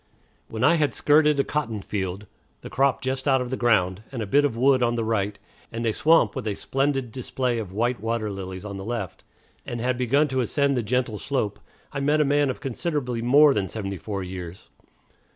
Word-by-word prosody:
When 110 +1 -4
I 170 - +5
had 145 -8 +1
skirted 150 +1 +4
a - - +4
cotton 115 -10 -3
field 95 0 -4 0.4
the - - -9
crop 135 +1 +1
just 130 +1 -2
out 135 -1 +4
of 125 0 -4
the - - 0
ground 100 -6 +2
and 130 - -5
a - - -3
bit 140 +8 +3
of 120 -5 -1
wood 130 +1 +4
on 120 -1 +2
the 115 - -1
right, 105 -2 -1 0.3
and 115 +1 -4
a 110 - +1
swamp 155 -8 +3
with - - -4
a 105 - -1
splendid 135 -1 -1
display 125 -1 -2
of 105 -5 -6
white 120 +5 0
water 115 0 -2
lilies 95 0 -7
on 100 -1 -6
the 95 - -6
left, 110 -5 -5 0.4
and 120 - -5
had 125 +1 -1
begun 140 +5 +3
to 130 0 -1
ascend 140 +4 +1
the 125 - +1
gentle 115 -1 -1
slope, 130 -7 -2 0.3
I 140 - -2
met 145 +2 +2
a 150 - +4
man 145 0 +2
of 130 - -4
considerably 135 -3 -2
more 140 +4 +6
than 100 -5 -1
seventy 100 0 -5
four 100 +1 -4
years. 90 -1 -8
120 Hz, 215 wpm, -24 LUFS, 105-140 Hz, 0.4 s, more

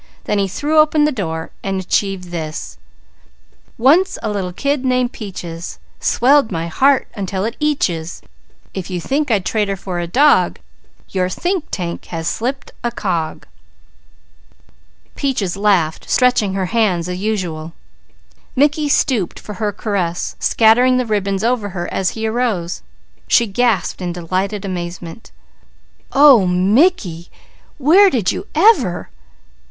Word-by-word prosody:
Then 210 - 0
he 195 - +1
threw 300 - +1
open 305 -1 +4
his 300 - +1
door 160 -8 -4
and 195 -1 -2
achieved 190 -1 -1
this: 160 -2 -6 1.0
"_Once 320 +11 +4
a 215 - -1
little 190 -3 -3
kid 280 +8 -1
named 250 -1 +1
Peaches, 180 -7 -7 0.2
Swelled 270 -2 +3
my 165 -2 -2
heart 270 - +3
until 195 -2 -3
it 230 - -3
eatches. 185 - -1 0.5
If 190 -1 -5
you 180 -1 -3
think 280 - -1
I'd 205 -5 +1
trade 215 -2 0
her 195 - -1
for 185 -2 -5
a 170 - -3
dog, 285 - +3 0.5
Your 185 -1 -1
think 355 - -2
tank 170 -2 -4
has 165 -1 -5
slipped 265 +8 -3
a 240 - +1
cog!_" 175 -8 -3 1.7
Peaches 235 -11 -1
laughed, 190 -6 +1
stretching 235 -6 +2
her 190 -1 0
hands 190 -7 +1
as 180 0 -4
usual. 175 -6 -3 0.8
Mickey 295 +2 +2
stooped 230 -10 +1
for 210 - -8
her 210 -1 +1
caress, 195 -5 -2
scattering 245 +3 +4
the 255 - 0
ribbons 200 -2 -1
over 230 -3 0
her 175 - -3
as 190 +3 -1
he 220 - -2
arose. 220 -7 -1 0.5
She 235 - +4
gasped 225 -2 0
in 175 -1 -3
delighted 185 +4 -3
amazement. 175 +1 -6 0.8
"Oh! 270 -9 +6
Mickey! 185 - +2 0.5
Where 350 +9 +6
did 235 - 0
you 395 - -6
ever? 310 - +3
205 Hz, 135 wpm, -18 LUFS, 180-255 Hz, 1.7 s, Oh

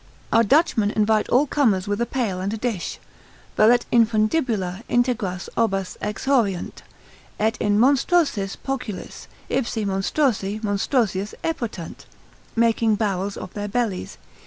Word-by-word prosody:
Our 230 - +6
Dutchmen 230 -4 +3
invite 215 0 +1
all 265 +4 +4
comers 225 -11 +1
with 205 +2 -1
a 235 - 0
pail 220 -8 -2
and 195 +2 -2
a 225 - -3
dish, 220 -6 -3 0.6
Velut 235 +3 +5
infundibula 220 - +1
integras 235 -7 0
obbas 195 -5 0
exhauriunt, 210 -3 -1 0.6
et 220 +2 +1
in 205 -1 +2
monstrosis 265 - +2
poculis, 250 -7 -6 0.2
ipsi 230 -4 -1
monstrosi 200 +1 0
monstrosius 205 -1 0
epotant, 235 - -4 0.5
making 230 -1 +3
barrels 200 -2 -2
of - - -8
their 205 0 -4
bellies. 210 -3 -2
215 Hz, 120 wpm, -23 LUFS, 200-245 Hz, 0.6 s, Our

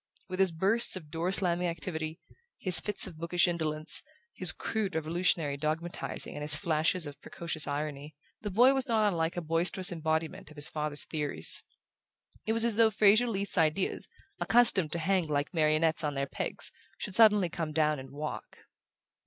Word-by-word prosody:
With 185 0 -6
his 190 -2 +4
bursts 195 +9 +2
of 155 -5 -9
door 170 +3 -2
slamming 180 -2 +1
activity, 160 0 -4 0.4
his 185 -3 +4
fits 210 -1 +3
of 155 - -10
bookish 170 +2 +1
indolence, 155 -2 +2 0.3
his 185 -4 +4
crude 205 -1 -4
revolutionary 160 -2 -1
dogmatizing 155 +4 -4
and - - -7
his 150 0 +4
flashes 160 +2 0
of 145 -1 -9
precocious 160 -3 -2
irony, 145 0 -5 0.3
the 210 - -4
boy 245 +7 +4
was 265 0 -1
not 220 -3 +2
unlike 165 -3 -1
a - - -2
boisterous 170 +3 0
embodiment 160 -1 -3
of 155 - -15
his 145 0 +2
father's 150 -1 -1
theories. 145 - 0 0.9
It 220 - +1
was 230 0 +3
as 230 -3 0
though 225 -1 +5
Fraser 215 +3 +3
Leath's 200 -4 -3
ideas, 160 +4 0 0.3
accustomed 205 -9 +4
to - - +1
hang 180 0 0
like 145 +2 -2
marionettes 160 0 +1
on 145 -1 -2
their 135 0 -1
pegs, - - -3 0.3
should 205 - -6
suddenly 210 -3 +5
come 165 -1 -5
down 150 -1 0
and 130 0 -10
walk. 150 +3 -7
165 Hz, 170 wpm, -29 LUFS, 155-190 Hz, 0.9 s, though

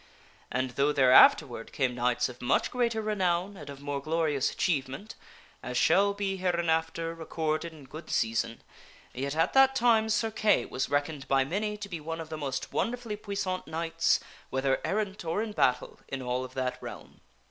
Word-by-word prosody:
And 130 +1 -1
though 140 +4 +2
there 130 -3 +4
afterward 125 -3 +6
came 130 -3 0
knights 120 0 +1
of 125 -1 -11
much 125 - +1
greater 235 -3 0
renown 190 -2 0
and 150 -6 -10
of 140 0 -9
more 145 -1 -3
glorious 155 -3 0
achievement 145 +5 -2 0.5
(as 125 +1 -4
shall 200 +8 +4
be 195 -1 -2
hereinafter 165 -2 0
recorded 160 0 -2
in 155 -3 -13
good 155 +5 -10
season), 115 +1 -1 0.5
yet 140 +3 -3
at 165 +1 +1
that 270 0 +6
time 230 -3 +3
Sir 225 0 +1
Kay 215 -1 +2
was 130 - -3
reckoned 145 -1 -1
by 135 0 +3
many 210 +7 -2
to 205 -1 -6
be 175 -4 -5
one 165 +2 -5
of 160 -1 -7
the 160 - -4
most 140 -3 -4
wonder 245 +2 0
fully 230 -4 -5
puissant 200 -3 -3
knights 165 +1 +1 0.3
(whether 135 0 0
errant 205 -1 -2
or 170 +6 -1
in 225 - -5
battle) 125 -11 0
in 135 -1 -5
all 125 +1 -1
of 130 0 -9
that 130 -1 -2
realm. - - -10
160 Hz, 180 wpm, -29 LUFS, 135-200 Hz, 0.5 s, afterward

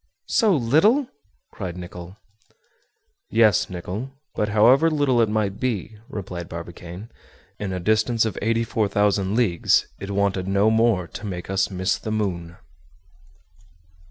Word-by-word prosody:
"So 215 -6 +3
little?" 160 - +3 0.4
cried 90 -3 -6
Nicholl. 90 +1 -9 1.1
"Yes, 110 -2 +3
Nicholl; 95 +7 -5 0.2
but 105 - -1
however 120 +9 +5
little 145 -6 +2
it 110 - +2
might 105 -2 -1
be," 115 -4 -2
replied 90 -7 -6
Barbicane, 85 +4 -8 0.5
"in 100 -2 -3
a 90 - -3
distance 110 +4 +2
of 110 - -2
84,000 105 -3 +1
leagues, 105 -9 +2
it 100 - -7
wanted 100 -2 0
no 100 +3 +3
more 110 -5 +2
to 105 - -8
make 90 -1 -5
us 95 0 +1
miss 95 0 -1
the - - -6
moon." 90 -6 -3
105 Hz, 130 wpm, -23 LUFS, 95-115 Hz, 1.1 s, however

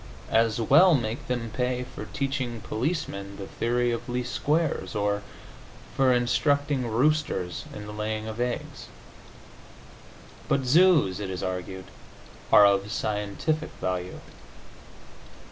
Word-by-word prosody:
As 115 0 +3
well 155 +9 +6
make 120 +1 -3
them 120 -3 -2
pay 125 +1 -1
for 130 +1 -8
teaching 135 -5 -3
policemen 110 - -3
the 100 - -6
theory 120 +3 0
of 115 - -4
least 125 0 -3
squares, 155 -4 0
or 105 0 0 0.7
for 135 -1 +4
instructing 130 +2 +1
roosters 115 - 0
in 105 - -8
the 105 - -8
laying 110 +1 -3
of 110 +2 -4
eggs. 125 0 -4 1.6
But 135 - +1
zoos, 150 - +4
it 100 -2 -4
is 95 -2 -4
argued, 95 0 -4 0.7
are 105 - +9
of 100 0 +2
scientific 105 +10 -2
value. 90 0 -3
120 Hz, 120 wpm, -26 LUFS, 105-135 Hz, 1.6 s, are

